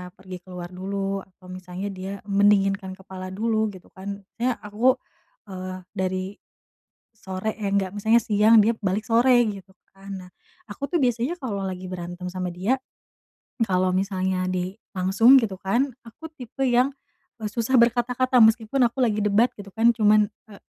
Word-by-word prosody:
pergi 185 -1 -9
keluar 180 -1 -9
dulu 195 +1 -3
atau 185 -1 -15
misalnya 185 +1 -6
dia 190 0 -6
mendinginkan 195 -1 +2
kepala 190 -1 -9
dulu 220 +3 0
gitu 185 - -16
kan. 200 +1 -7 0.2
Nya 245 0 +1
aku, 225 +5 +2 0.5
eee, 185 -1 -7
dari, 185 -1 -2 0.9
sore 190 +1 -4
eh 205 -2 -3
nggak, 195 -1 0
misalnya 220 +3 +4
siang, 220 0 +5
dia 220 +2 +4
balik 200 +2 -1
sore 235 +3 +4 0.2
gitu 195 -2 -7 0.3
kan. 195 +1 -12 0.2
Nah - - -17 0.4
aku 205 +7 -6
tuh 345 - +2
biasanya 245 +2 +1
kalau 210 -7 -3
lagi 185 -1 -5
berantem 175 0 -6
sama 180 0 -4
dia, 190 +9 0 0.9
kalau 185 -2 +1
misalnya 190 -1 0
di, 185 +1 -3 0.2
langsung 200 +8 +6
gitu 205 -4 -2
kan, 235 +9 0
aku 235 +8 -11
tipe 255 +1 -5
yang, 250 +2 +3 0.5
eee, 215 - -3
susah 230 +4 +1
berkata-kata 245 +1 +3
meskipun 225 +3 +3
aku 240 +2 0
lagi 215 -4 +2
debat 210 +3 +4
gitu 200 -1 -11
kan, 230 +3 +3
cuman, 210 -1 +4 0.2
eee, 200 - -12
200 Hz, 155 wpm, -24 LUFS, 185-230 Hz, 0.9 s, langsung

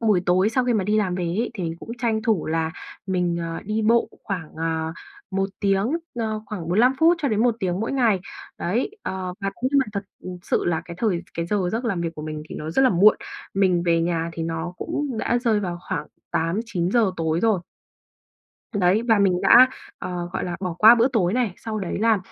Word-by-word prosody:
buổi 210 -6 +3
tối 185 +3 +4
sau 250 +2 +1
khi 245 - +2
mà 205 -4 +1
đi 210 +2 +1
làm 185 -4 0
về 180 - -2
ấy 190 +8 -1
thì 195 - -4
mìnhcũng 165 +6 -6
tranh 225 -3 0
thủ 220 -6 +1
là 160 0 0 0.4
mình, 180 -2 0
ờ, 165 0 -4
đi 215 +2 -1
bộ 230 +2 +3 0.2
khoảng, 175 -6 -5
ờ, 160 0 -2 0.4
1 195 0 0
tiếng 200 +3 +2 0.2
ờ, 220 -2 -2
khoảng 185 -6 -6
45 225 +9 +4
phút 330 +3 +5
cho 280 - +2
đến 215 -1 +1
1 245 -2 +3
tiếng 180 0 -1
mỗi 225 - -2
ngày. 230 -8 +2 0.4
Đấy, 230 - -1
ờ, 185 -1 -4
và 195 0 -1
cũng 245 +4 -1
nhưng 280 - +5
mà 265 - +2
thật 200 - -2 0.4
sự - - 0
là 165 -2 0
cái 170 - -8
thời 190 -6 0
cái 170 0 -2
giờ 205 +4 0 0.2
giấc 230 +3 -2
làm 200 -7 -1
việc 165 -1 -3
của 150 - -7
mình 155 0 -5
thì - - -8
nó 155 - -5
rất 185 - +2
là 260 - +5
muộn, 200 +4 +6 0.4
mình 185 -3 +3
về 165 -1 +3
nhà 165 -1 -1
thì 165 0 -4
nó 165 +2 -3
cũng 275 0 -3
đã 240 +2 +1
rơi 230 -4 +1
vào 175 -3 -3
khoảng 165 -6 -2 0.2
8:00-9:00 190 +4 0
tối 160 0 0
rồi. 220 -5 +2 1.1
Đấy, 195 +2 +3
và 225 -2 +5
mình 185 -3 +3
đã, 255 +2 +8 0.3
ờ, 175 -1 -4
gọi - - -2
là, 175 -1 -3
bỏ 180 -3 -3
qua 220 +2 +9
bữa 235 +2 +3
tối 200 -9 +1
này, 235 -5 0
sau 220 -1 -5
đấy 190 -4 -3
là, 225 0 +3
195 Hz, 225 wpm, -23 LUFS, 170-225 Hz, 1.1 s, qua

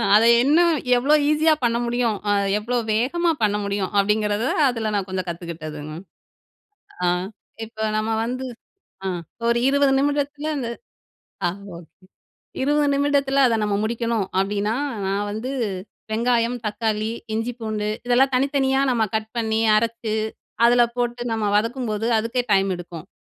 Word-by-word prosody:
அத 215 - +6 0.2
இன்னும் 335 +5 +4 0.3
எவ்வளவு 290 +4 +3
ஈஸியா 310 +1 +4
பண்ண 235 -1 +2
முடியும், 235 -2 0 0.4
எவ்வளோ 240 +4 -2 0.2
வேகமா 330 +10 +1
பண்ண 205 -1 +2
முடியும். 200 -1 -2
அப்படிங்குறத 210 +1 +1 0.3
அதுல 225 -3 -2
நான் 200 -1 -1
கொஞ்சம் 185 -1 -3
கத்துக்கிட்டதும்மா. 155 -3 -7 1.1
ஆ - - +3 0.6
இப்போ, 220 0 -8
நம்ம 215 +1 -1
வந்து 255 +2 -3 0.6
ஆ - - 0 0.4
ஒரு 235 0 +3
20 280 0 +3
நிமிடத்துல 290 +1 -1
இந்த 240 -4 -3 0.8
ஆ - - +3 0.3
ஓகே! 170 +2 -16 0.6
20 290 +1 +2
நிமிடத்துல 280 -1 +2
அத 235 - +2
நம்ம 205 -1 0
முடிக்கணும். 230 -2 -1
அப்படின்னா, 205 +3 0 0.3
நான் 200 +2 -1
வந்து 220 +5 -4 0.6
வெங்காயம், 235 +1 +1
தக்காளி, 215 0 -1 0.2
இஞ்சி, 225 +2 -1
பூண்டு 215 -1 -2 0.2
இதெல்லாம் 260 +2 +3
தனித்தனியா 270 0 +2
நம்ப 235 -3 +2
கட் 220 0 -4
பண்ணி 220 -1 0 0.2
அரைச்சு, 230 0 -1 0.5
அதுல 240 0 +5
போட்டு 240 0 -1
நம்ப 220 -2 -1
வதக்கும்போது 230 -1 -1
அதுக்கே 230 +3 -1
டைம் 195 0 +3
எடுக்கும். 175 -2 -9
230 Hz, 130 wpm, -22 LUFS, 210-260 Hz, 1.1 s, அத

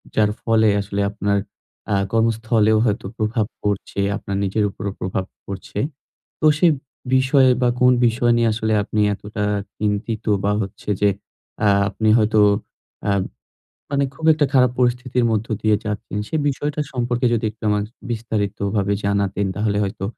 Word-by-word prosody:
যার 105 -1 +3
ফলে 110 -1 +3
আসলে 100 0 -3
আপনার 100 -1 0 0.6
আ - - +3 0.2
কর্মস্থলেও 110 -1 +2
হয়তো 105 -3 -1
প্রভাব 110 0 0 0.2
পড়ছে, 100 -1 -2 0.2
আপনার 100 - -5
নিজের 100 +2 0
উপরও 100 0 -5
প্রভাব 95 0 -2 0.2
পড়ছে। 100 +1 -6 0.6
তো 155 - +2
সে 175 - +5 0.5
বিষয়ে 130 0 +4
বা 125 - +4
কোন 125 0 +6
বিষয় 120 +1 +2
নিয়ে 115 - +3
আসলে 110 0 -1
আপনি 105 - -3
এতটা 105 +1 -5 0.3
চিন্তিত 105 +1 -2 0.2
বা 100 - +2
হচ্ছে 100 +1 -7
যে 105 - +5 0.6
আ - - +5 0.2
আপনি 110 -1 0
হয়তো 110 0 +3 0.7
আ - - +2 0.8
মানে 140 0 +2
খুব 160 - -6
একটা 150 -1 +2
খারাপ 125 -2 +5
পরিস্থিতির 125 0 +1
মধ্য 110 0 -1
দিয়ে 110 -1 +3
যাচ্ছেন। 105 0 -4
সে - - -4
বিষয়টা 145 +2 -2
সম্পর্কে 120 0 -1
যদি 115 -1 0
একটু 110 - -19
আমা 105 0 +2 0.3
বিস্তারিত 110 -3 -2 0.2
ভাবে 100 0 +1
জানাতেন 100 0 0
তাহলে 105 0 0
হয়তো 95 -1 -4
110 Hz, 150 wpm, -21 LUFS, 100-120 Hz, 0.8 s, কোন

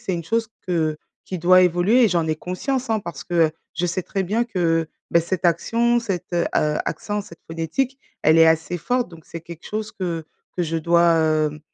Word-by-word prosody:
c'est 190 - -2
une 170 -2 -4
chose 225 +3 0 0.2
que 160 -4 0 0.3
qui 185 - -4
doit 185 +2 +6
évoluer 180 +8 +4
et - - +4
j'en 170 -4 +1
ai 155 -1 0
conscience, 250 - -3
hein. 220 -1 +1
Parce 170 -8 -7
que, 175 - -5
heu, 165 -2 +4 0.2
je 175 +2 -1
sais 175 +1 -1
très 195 +2 -2
bien 215 +6 0
que, 165 -7 0 0.2
bah, 170 - +5
cette 180 +2 -3
action, 230 +8 +2
cet, 185 -6 -4
heu, 170 -1 +2
heu, 150 0 +1
accent, 210 0 -2
cette 170 -4 -13
phonétique, 165 - -2 0.2
elle 160 +2 +5
est 165 - +8
assez 160 +2 +1
forte. 245 +8 0
Donc 165 -2 -14
c'est 165 - -7
quelque 170 -1 -11
chose 215 0 -4
que 170 -4 -3 0.3
que 175 - +1
je 165 0 -1
dois, 170 +2 +3 0.2
hem, 155 -1 +1
175 Hz, 215 wpm, -22 LUFS, 165-205 Hz, 0.3 s, est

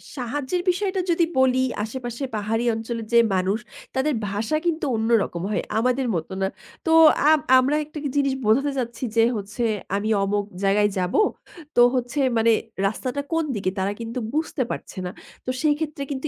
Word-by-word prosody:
সাহায্যের 280 +6 -2
বিষয়টা 380 +1 0
যদি 335 0 +3
বলি, 260 0 +4 0.2
আশেপাশে 240 +3 -5
পাহাড়ি 220 +3 -1
অঞ্চলের 225 0 -4
যে 235 - +7 0.2
মানুষ 190 +3 +1 0.4
তাদের 280 +3 +1 0.2
ভাষা 220 +9 -1
কিন্তু 330 -2 0
অন্যরকম 220 -6 +1
হয়, 205 - 0 0.2
আমাদের 250 +2 +1
মতো 165 +2 -4
না। 190 - +2 0.4
তো 325 - +1 0.4
আ - - +7 0.3
আমরা 270 +3 +2
একটা 305 +1 -11 0.2
জিনিস 275 -1 +2
বোঝাতে 270 +7 +3
চাচ্ছি 235 -1 -4
যে 225 - +6
হচ্ছে, 210 +4 -4 0.3
আমি 205 +2 -1
অমুক 205 +1 0 0.2
জায়গায় 205 +1 +3
যাব, 180 -1 -1 0.6
তো 240 - +6
হচ্ছে 250 +2 -2 0.2
মানে 225 +1 +4 0.4
রাস্তাটা 255 +7 -3
কোন 325 0 +2
দিকে 195 -2 -1
তারা 190 +1 0
কিন্তু 230 +2 -4
বুঝতে 310 -3 -1
পারছে - - -7
না। 180 - -3 0.3
তো - - -4
সেইক্ষেত্রে 300 -1 0
কিন্তু 275 +2 -3
240 Hz, 160 wpm, -23 LUFS, 215-285 Hz, 0.6 s, যে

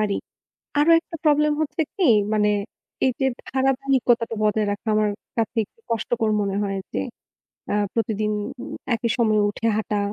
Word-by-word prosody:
পারি। 210 -2 +1 0.6
আরও 320 +3 +4
একটা 330 0 -9
problem 300 0 +4
হচ্ছে 310 +2 0
কি, 370 -5 +3 0.3
মানে 210 -1 +3 0.5
এই 260 - +3
যে 265 - +3 0.2
ধারাবাহিকতাটা 260 -3 +1
বজায় 210 0 +2
রাখা 205 +2 -6
আমার 215 -1 +2 0.3
কাছে 225 +1 -1
একটু 455 - -29
কষ্টকর 225 -1 0
মনে 200 -1 -1
হয় 195 -1 -2
যে - - -1 0.7
আ - - +2 0.2
প্রতিদিন 215 -2 0 0.6
একই 230 +1 -2
সময়ে 215 -3 +3
উঠে 225 +2 -2
হাঁটা। 210 -1 -1
225 Hz, 150 wpm, -23 LUFS, 210-265 Hz, 0.7 s, আরও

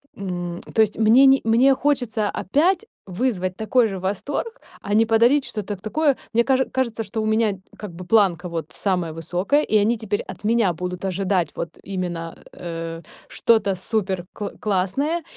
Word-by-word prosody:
м, 175 -3 -4
то 220 - +4
есть 215 -1 +1
мне 225 +5 +6
не, 270 0 +6
мне 245 +5 +5
хочется 245 -7 0
опять 345 - +1 0.2
вызвать 185 -2 -2
такой 225 +2 +2
же 195 -2 -5
восторг, 275 - -3 0.2
а 205 - -3
не 225 +1 +5
подарить 235 +5 +4
что-то 210 -2 -4
такое 275 - 0 0.2
мне 235 +1 +4
каже 265 0 +2
кажется, 235 -4 -1
что 220 +1 -4
у - - -2
меня, 215 -2 +1 0.2
как 205 -5 -8
бы, 180 +1 -8
планка 185 -5 +2
вот 165 -2 -4
самая 180 -5 -1
высокая, 180 - 0
и 215 - +2
они 220 +3 +2
теперь 210 -2 -2
от - - -10
меня 220 -5 +2
будут 180 +2 -5
ожидать 185 -3 0
вот 170 - -4
именно, 175 -4 -4 0.2
э, 165 -1 -6 0.3
что-то 210 -4 +2
супер 190 -1 -2
кл 205 -1 -4
классное. 215 - 0
210 Hz, 170 wpm, -22 LUFS, 180-235 Hz, 0.3 s, мне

